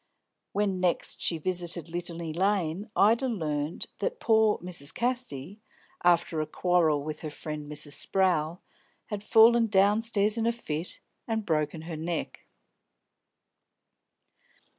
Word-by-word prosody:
When 195 -2 0
next 180 -2 0
she 165 - +1
visited 175 0 -2
Litany 170 -1 -4
Lane, 190 +1 0
Ida 230 +6 +4
learnt 155 - -2
that - - -2
"pore 220 -1 +3
Mrs. 175 -5 -2
Casty," 235 - -2 0.4
after 170 -2 +3
a 155 - -3
quarrel 160 -3 +2
with 155 0 -5
her 155 - -5
friend 150 0 -7
Mrs. 150 0 -1 0.2
Sprowl, 175 -3 +1 0.5
had 205 -1 -4
fallen 230 +2 +6
downstairs 210 +2 +2
in 225 - +1
a - - +4
fit 170 -8 -3 0.3
and 220 -2 -2
broken 155 -1 -1
her 165 -1 -6
neck. 165 +1 -4
175 Hz, 120 wpm, -28 LUFS, 155-210 Hz, 0.5 s, fallen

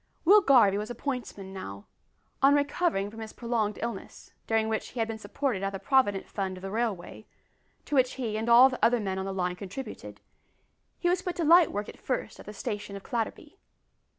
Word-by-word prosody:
Will 410 +5 +8
Garvie 230 - +5
was 210 +2 -5
a 240 - -5
pointsman 235 -8 -5
now. 100 - -8 0.6
On 275 +1 +6
recovering 285 - 0
from 225 - -11
his 220 -1 -7
prolonged 230 -3 -1
illness, 230 -4 -7
during 225 -1 +1
which 220 0 -2
he 245 - -8
had 225 - +1
been 225 -1 -5
supported 220 0 -2
out 195 - 0
of 195 - -5
the 195 - -7
Provident 205 -8 +2
Fund 190 -2 -4
of 185 - -12
the 195 - -5
railway 215 -3 -3 0.6
to - - -8
which 260 -2 +3
he 230 -5 -3
and 220 +2 -2
all 240 +3 +9
the 255 -1 -5
other 240 0 +4
men 190 -3 -2
on 190 - -3
the 195 - -3
line 180 -2 -1
contributed 200 +8 -8 0.8
he 350 - -1
was 360 +1 +2
put 360 -1 -4
to 340 - -1
light 335 +1 +6
work 205 0 -3
at - - -11
first 255 -4 -3
at - - -12
the - - -6
station 205 0 -5
of 200 - -8
Clatterby. 260 - -4
225 Hz, 215 wpm, -28 LUFS, 200-265 Hz, 0.8 s, all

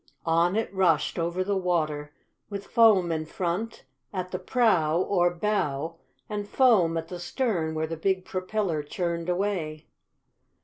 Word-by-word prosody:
On 170 +3 +3
it 225 -2 -1
rushed 180 -4 +2
over 170 +2 0
the 200 +1 -1
water, 155 -5 -1 0.4
with 200 -1 -5
foam 210 -7 +5
in 160 -1 -1
front, 185 +7 -3 0.3
at 185 -2 -4
the 185 - -3
prow, 185 -7 +2
or 180 -2 +2
bow, 165 -5 -1 0.3
and 205 -2 -4
foam 200 -11 +4
at 165 0 -4
the 180 - -6
stern 175 -6 -1
where 155 0 0
the 165 +1 -5
big 190 +2 0
propeller 185 -3 -2
churned 170 +3 -3
away. 175 -5 -2
180 Hz, 145 wpm, -27 LUFS, 165-200 Hz, 0.4 s, foam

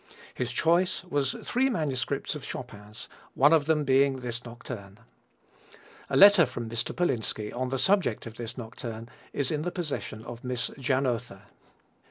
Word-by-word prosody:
His 125 -1 -2
choice 175 +8 +2
was 145 -7 -1
three 265 +2 +1
manuscripts 145 - -1
of - - -7
Chopin's, 105 +1 -8 0.3
one 145 +4 +6
of 155 -3 +4
them 155 -2 +3
being 135 0 +4
this 120 0 -4
nocturne. 115 -4 -9 1.1
A - - +1
letter 200 -5 +8
from 120 -2 -5
Mr. 115 +1 -2
Polinski 110 -10 -1
on 130 +1 -1
the 135 - -1
subject 190 - +2
of 115 - -7
this 120 +1 -6
nocturne 115 -1 -7 0.2
is 140 -2 -1
in 150 -1 -1
the 175 - -1
possession 150 - -4
of 120 -1 -8
Miss 125 -1 -2
Janotha. 125 -6 -1
130 Hz, 155 wpm, -28 LUFS, 115-155 Hz, 1.1 s, letter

